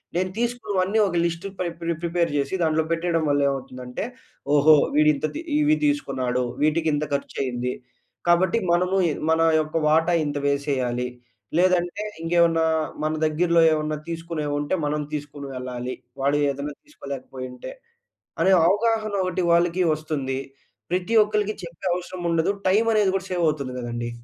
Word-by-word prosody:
నేను 185 Hz, +1 st, 0 dB
తీసుకున్నవన్నీ 220 Hz, -4 st, 0 dB
ఒక 175 Hz, -, -3 dB
లిస్ట్ 170 Hz, +3 st, -3 dB
పై 180 Hz, -, 0 dB
ప్రి 170 Hz, 0 st, -1 dB
ప్రిపేర్ 170 Hz, -1 st, 0 dB
జేసి. 140 Hz, +6 st, 0 dB
దాంట్లో 160 Hz, 0 st, +2 dB
పెట్టేయడం 165 Hz, -1 st, 0 dB
వల్ల 145 Hz, 0 st, +2 dB
ఏమవుతుందంటే, 125 Hz, -, -5 dB, 0.5 s
ఓహో! 155 Hz, +2 st, +7 dB, 0.2 s
వీడు 150 Hz, 0 st, +5 dB
ఇంత 140 Hz, -, -3 dB
తి 315 Hz, -, -3 dB, 0.2 s
ఇవి 300 Hz, +1 st, +4 dB
తీసుకున్నాడు. 130 Hz, -, 0 dB, 0.2 s
వీటికి 160 Hz, +1 st, +2 dB
ఇంత 145 Hz, -, 0 dB
ఖర్చు 140 Hz, -, -3 dB
అయ్యింది. 125 Hz, 0 st, -2 dB, 0.6 s
కాబట్టి 175 Hz, +4 st, +4 dB
మనము 180 Hz, +2 st, +2 dB, 0.3 s
మన 160 Hz, 0 st, +3 dB, 0.2 s
యొక్క 155 Hz, +1 st, -7 dB
వాటా 160 Hz, +3 st, +3 dB
ఇంత 145 Hz, 0 st, -2 dB
వేసేయాలి. 130 Hz, -4 st, 0 dB, 0.5 s
లేదంటే 180 Hz, +1 st, +2 dB, 0.2 s
ఇంకేమన్నా 165 Hz, -1 st, +3 dB, 0.4 s
మన 155 Hz, 0 st, 0 dB
దగ్గరలో 165 Hz, +2 st, +3 dB
ఏమైనా 155 Hz, 0 st, -1 dB
తీసుకునేవుంటే, 155 Hz, -3 st, -3 dB
మనం 150 Hz, +1 st, -1 dB
తీసుకొని 145 Hz, -1 st, -5 dB
వెళ్ళాలి. 125 Hz, 0 st, -5 dB, 0.3 s
వాడు 140 Hz, +2 st, +2 dB
ఏదన్నా 140 Hz, +1 st, -4 dB
తీసుకోలేకపోయుంటే. 130 Hz, -, -8 dB, 0.7 s
అనే 190 Hz, -, +4 dB, 0.2 s
అవగాహన 215 Hz, +1 st, +1 dB
ఒకటి 185 Hz, 0 st, -1 dB
వాళ్ళకి 170 Hz, +1 st, +3 dB
వస్తుంది. 140 Hz, -4 st, -3 dB, 0.5 s
ప్రతి 180 Hz, +5 st, -1 dB
ఒక్కళ్ళకి 210 Hz, 0 st, -1 dB
చెప్పే 170 Hz, +1 st, -9 dB
అవసరం 180 Hz, 0 st, -5 dB
ఉండదు. 165 Hz, +2 st, +2 dB, 0.2 s
టైమ్ 215 Hz, +5 st, +3 dB
అనేది 210 Hz, -3 st, +3 dB
గూడా 190 Hz, 0 st, -2 dB
సేవ్ 180 Hz, -, 0 dB
అవుతుంది 140 Hz, -4 st, -1 dB
గదండి. 120 Hz, -1 st, -4 dB
160 Hz, 140 wpm, -24 LUFS, 140-180 Hz, 0.7 s, ఓహో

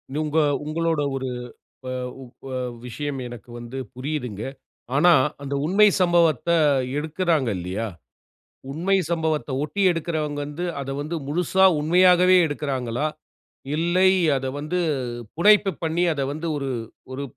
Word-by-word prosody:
உங்க 155 Hz, +1 st, 0 dB, 0.3 s
உங்களோட 165 Hz, 0 st, 0 dB
ஒரு 130 Hz, 0 st, -3 dB, 0.6 s
வ -, -, -4 dB, 0.6 s
வ -, -, -7 dB, 0.4 s
விஷயம் 140 Hz, +3 st, -4 dB
எனக்கு 120 Hz, -1 st, -11 dB
வந்து 120 Hz, +2 st, -8 dB, 0.2 s
புரியுதுங்க. 125 Hz, -6 st, -4 dB, 0.5 s
ஆனா 175 Hz, +5 st, +6 dB, 0.3 s
அந்த 140 Hz, 0 st, -3 dB
உண்மை 200 Hz, +6 st, +5 dB
சம்பவத்தை 170 Hz, -2 st, +3 dB, 0.4 s
எடுக்குறாங்க 160 Hz, -3 st, 0 dB
இல்லையா? 90 Hz, +6 st, -3 dB, 0.8 s
உண்மை 180 Hz, +7 st, +1 dB
சம்பவத்தை 160 Hz, -4 st, -1 dB
ஒட்டி 155 Hz, +7 st, -3 dB
எடுக்கிறவங்க 155 Hz, -3 st, -2 dB
வந்து, 150 Hz, +5 st, -5 dB
அதை 135 Hz, 0 st, -4 dB
வந்து 155 Hz, +4 st, -4 dB
முழுசா 180 Hz, +5 st, +2 dB
உண்மையாகவே 180 Hz, +3 st, +5 dB
எடுக்குறாங்களா? 135 Hz, -2 st, -2 dB, 0.7 s
இல்லை, 175 Hz, +4 st, +3 dB, 0.3 s
அதை 135 Hz, 0 st, -3 dB
வந்து 155 Hz, +5 st, -2 dB, 0.6 s
புனைப்பு 205 Hz, +2 st, +5 dB
பண்ணி, 165 Hz, +2 st, +1 dB
அதை 140 Hz, -2 st, -2 dB
வந்து 155 Hz, +3 st, -4 dB
ஒரு 135 Hz, -1 st, -3 dB, 0.4 s
ஒரு 140 Hz, +2 st, -4 dB
155 Hz, 115 wpm, -23 LUFS, 140-175 Hz, 0.8 s, ஆனா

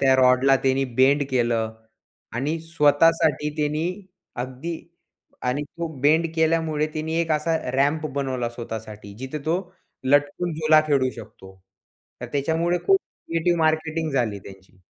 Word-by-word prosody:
त्या 135 Hz, -1 st, +5 dB
रॉडला 130 Hz, +1 st, +5 dB
त्याने 135 Hz, +1 st, +2 dB, 0.2 s
बेंड 140 Hz, +2 st, +5 dB
केलं. 115 Hz, -3 st, 0 dB, 0.6 s
आणि 145 Hz, +7 st, -1 dB
स्वतःसाठी 160 Hz, -1 st, +3 dB
त्यानी 150 Hz, +2 st, 0 dB, 0.6 s
अगदी 130 Hz, +7 st, -5 dB, 0.7 s
आणि 135 Hz, +4 st, 0 dB
तो 170 Hz, +3 st, -6 dB
बेंड 155 Hz, +4 st, +4 dB
केल्यामुळे 160 Hz, -2 st, +1 dB
तिने 160 Hz, +1 st, -3 dB
एक 165 Hz, -, -2 dB
असा 160 Hz, +2 st, +1 dB, 0.2 s
रॅम्प 145 Hz, +4 st, +1 dB
बनवला 130 Hz, -4 st, -1 dB
स्वतःसाठी 110 Hz, -3 st, -8 dB
जिथे 130 Hz, +4 st, -5 dB
तो, 165 Hz, +2 st, +2 dB, 0.5 s
लटकून 145 Hz, +5 st, +2 dB
झुला 155 Hz, 0 st, +5 dB
खेळू 135 Hz, -4 st, +2 dB
शकतो. 105 Hz, -4 st, -12 dB, 0.7 s
तर 125 Hz, -, -5 dB
त्याच्यामुळे 165 Hz, +5 st, 0 dB
खूप 390 Hz, -, +6 dB
क्रिएटिव्ह 170 Hz, -, -2 dB
मार्केटिंग 160 Hz, 0 st, 0 dB
झाली 115 Hz, -6 st, 0 dB
त्याची. 95 Hz, 0 st, -15 dB
145 Hz, 130 wpm, -24 LUFS, 130-160 Hz, 0.7 s, खूप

